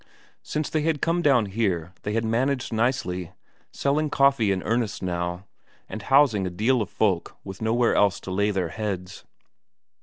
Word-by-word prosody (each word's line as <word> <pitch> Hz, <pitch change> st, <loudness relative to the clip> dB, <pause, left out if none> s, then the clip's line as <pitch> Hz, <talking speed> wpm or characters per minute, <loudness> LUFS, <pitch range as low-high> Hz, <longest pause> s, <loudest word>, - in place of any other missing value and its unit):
Since 150 Hz, -1 st, -3 dB
they 155 Hz, -, +1 dB
had 155 Hz, -1 st, 0 dB
come 170 Hz, +3 st, +1 dB
down 135 Hz, -8 st, +4 dB
here 95 Hz, -5 st, -2 dB
they 105 Hz, -, -3 dB
had 115 Hz, +1 st, 0 dB
managed 125 Hz, +3 st, 0 dB
nicely, 95 Hz, -7 st, -1 dB, 0.4 s
selling 150 Hz, +2 st, 0 dB
coffee 140 Hz, -7 st, +3 dB
in 95 Hz, -1 st, -1 dB
earnest 115 Hz, -3 st, -1 dB
now, 90 Hz, +1 st, -3 dB, 0.4 s
and 110 Hz, -, -6 dB
housing 120 Hz, -5 st, +3 dB
a -, -, -2 dB
deal 110 Hz, +8 st, +1 dB
of 105 Hz, -, -3 dB
folk 95 Hz, -6 st, -1 dB
with 95 Hz, +1 st, -9 dB
nowhere 115 Hz, +2 st, +2 dB
else 100 Hz, -4 st, +3 dB
to 95 Hz, -, -7 dB
lay 100 Hz, +2 st, +1 dB
their 95 Hz, -4 st, -1 dB
heads. 95 Hz, -1 st, -5 dB
110 Hz, 170 wpm, -25 LUFS, 95-130 Hz, 0.4 s, down